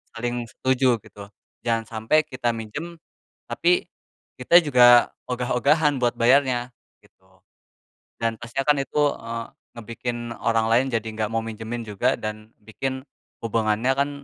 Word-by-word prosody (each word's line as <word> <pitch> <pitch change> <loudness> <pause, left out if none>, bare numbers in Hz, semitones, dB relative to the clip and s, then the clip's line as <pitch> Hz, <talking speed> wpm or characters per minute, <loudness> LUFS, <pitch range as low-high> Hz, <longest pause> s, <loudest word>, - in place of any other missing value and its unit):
saling 120 0 -3
setuju 130 +1 +1
gitu. 100 -1 -12 0.4
Jangan 115 -1 +1
sampai 115 +8 +1
kita 125 -4 -2
minjem, 145 +10 -7 0.6
tapi 175 +1 +2 0.6
kita 170 +8 +6
juga 125 -4 +6 0.2
ogah-ogahan 135 +4 +1
buat 120 -1 +1
bayarnya, 125 0 +2 0.3
gitu. - - -28 0.8
Dan 115 -1 0
pasti 120 +2 -6
akan 145 +1 +3
itu, 150 - -1 0.2
eee, 115 0 -6 0.3
ngebikin 120 +1 -5 0.2
orang 115 -1 +1
lain 120 +3 +4
jadi 115 -1 -1
enggak 110 -1 -3
mau 115 - +1
minjemin 115 +1 -6
juga 100 -2 +1
dan 110 +1 -7
bikin 130 +5 -4 0.4
hubungannya 115 +2 0
kan 140 +1 +1
120 Hz, 130 wpm, -23 LUFS, 115-130 Hz, 0.8 s, kita